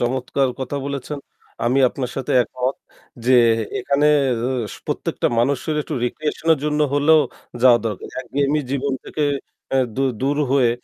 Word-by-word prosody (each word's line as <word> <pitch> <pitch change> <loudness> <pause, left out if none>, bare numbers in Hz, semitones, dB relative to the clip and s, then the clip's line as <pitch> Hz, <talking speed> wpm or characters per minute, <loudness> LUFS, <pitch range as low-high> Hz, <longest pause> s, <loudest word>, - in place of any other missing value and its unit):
চমৎকার 130 +2 0
কথা 130 +2 -3
বলেছেন। 140 +1 -4 0.5
আমি 125 +3 +2
আপনার 125 -1 -4
সাথে 135 +1 -2
একমত 125 +3 -2 0.5
যে 130 - +5 0.5
এখানের 145 +3 +3 0.6
সু - - -12
প্রত্যেকটা - - -1
মানুষের 140 +5 +1
একটু 150 - -5
recreation 155 +5 -3
এর - - -9
জন্য 150 0 0
হলেও 155 +2 +5 0.4
যাওয়া 125 -2 +7
দরকার। 110 - -5
একঘেয়েমি 145 +3 0
জীবন 140 0 -1
থেকে 155 - -3 0.5
অ্যা 135 - +2 0.2
দু 135 - +1 0.2
দূর 140 +2 +1 0.2
হয়ে 130 -4 +4
140 Hz, 145 wpm, -21 LUFS, 130-145 Hz, 0.6 s, যাওয়া